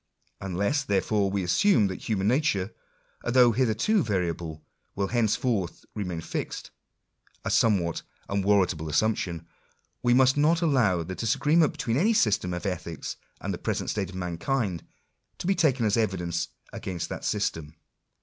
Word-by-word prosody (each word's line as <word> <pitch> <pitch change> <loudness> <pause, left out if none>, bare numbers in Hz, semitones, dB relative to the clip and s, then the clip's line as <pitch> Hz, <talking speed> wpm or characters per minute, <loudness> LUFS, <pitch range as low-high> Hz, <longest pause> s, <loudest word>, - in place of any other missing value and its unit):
Unless, 100 +10 -1
therefore, 100 -1 +1
we 100 -1 -1
assume 115 - +4
that 95 +2 -4
human 100 -3 +1
nature, 115 -6 +1 0.5
although 120 0 +5
hitherto 125 - +2
variable, 85 - -2 0.3
will 100 -1 -1
henceforth 115 - 0
re 105 - -3
main 90 -3 -4
fixed - - -5 0.4
— - - -35
a - - -1
somewhat 90 -7 +2 0.3
unwarrantable 95 -5 +1
assumption 85 -1 0 0.3
— - - -45
we 120 0 +3
must 130 +1 +4
not 160 +4 +3
allow 115 - +2
the 95 - -6
disagreement 145 - +2
between 115 +1 -2
any 210 +9 +3
system 105 - +2
of 90 +3 -4
ethics 85 -5 -4 0.2
and - - -2
the - - -5
present - - -2
state 100 -4 -2
of 95 - -10
mankind, 90 - -2 0.5
to - - -7
be 195 - +3
taken 135 -10 +2
as 105 - +2
evidence 90 -6 -1 0.3
against 95 -7 -4
that - - -6
system. 80 -1 -2
100 Hz, 150 wpm, -27 LUFS, 90-125 Hz, 0.5 s, although